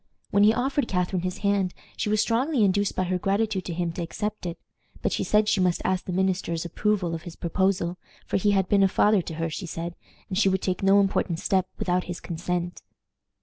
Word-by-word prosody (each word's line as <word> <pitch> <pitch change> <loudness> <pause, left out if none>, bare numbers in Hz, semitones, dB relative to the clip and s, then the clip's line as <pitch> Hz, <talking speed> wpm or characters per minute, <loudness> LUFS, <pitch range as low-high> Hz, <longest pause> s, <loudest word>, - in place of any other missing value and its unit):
When 200 - +4
he 210 +1 +7
offered 265 +3 0
Catharine 180 -1 0
his 185 +2 -3
hand, 200 -2 +1 0.2
she - - -2
was 215 0 +2
strongly 250 +2 +1
induced 200 +1 +2
by 185 - +1
her 180 0 -1
gratitude 200 0 0
to 175 - -3
him 170 -1 -1
to 170 - -5
accept 210 +3 -4
it, 170 0 -5 0.5
but - - +1
she - - 0
said 210 0 +3
she 205 - +2
must 180 -2 +2
ask 185 -1 0
the - - -4
minister's 180 -2 0
approval 185 0 0
of 165 - -4
his 170 -1 -9
proposal, 180 0 0 0.3
for - - 0
he 205 +2 +2
had 195 -2 +2
been 200 +1 +3
a 195 - +6
father 205 +1 +3
to 165 - -7
her, 165 0 -2
she 180 +3 -5
said, 170 +1 -5 0.3
and 190 0 -1
she 195 - +4
would 190 0 0
take 185 -1 -1
no 195 +1 +5
important 195 -3 +1
step 185 +1 +1
without 180 0 0
his 175 -1 -5
consent. 175 +1 -3
185 Hz, 225 wpm, -26 LUFS, 175-205 Hz, 0.5 s, he